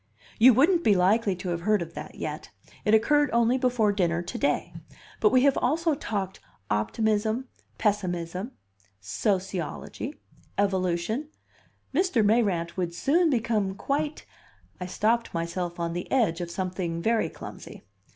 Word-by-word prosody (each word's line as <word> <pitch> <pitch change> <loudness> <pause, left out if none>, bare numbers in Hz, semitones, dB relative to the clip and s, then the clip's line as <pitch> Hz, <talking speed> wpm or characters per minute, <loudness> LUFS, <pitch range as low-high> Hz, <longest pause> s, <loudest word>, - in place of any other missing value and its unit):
"You 245 +1 +8
wouldn't 335 +7 +4
be 210 - +5
likely 195 +2 +3
to 185 0 -5
have 170 -1 -2
heard 210 0 +2
of 165 0 -11
that - - -8
yet. - - -5 0.4
It 210 - +5
occurred 290 +6 +3
only 235 +2 +3
before 245 -5 +2
dinner 175 -4 0
to 240 - -6
day. 285 - 0 0.5
But - - +4
we 255 0 +4
have 280 -1 +4
also 320 +5 +1
talked 200 -9 -3 0.3
optimism, 220 - 0 0.3
pessimism, 185 +1 -1 0.5
sociology, 185 - -3 0.4
evolution 195 - 0 0.6
Mr. 290 - +2
Mayrant 200 -6 +1
would 175 -2 -2
soon 330 - +3
become 220 -6 0
quite 290 +7 -2 0.3
" - - -34
I 180 - -3
stopped 225 +3 0
myself 170 +1 -3
on 170 0 -2
the 175 - -5
edge 205 -10 +2
of 175 - -4
something 180 -2 -3
very 230 0 +2
clumsy. - - -10
210 Hz, 140 wpm, -27 LUFS, 175-245 Hz, 0.6 s, You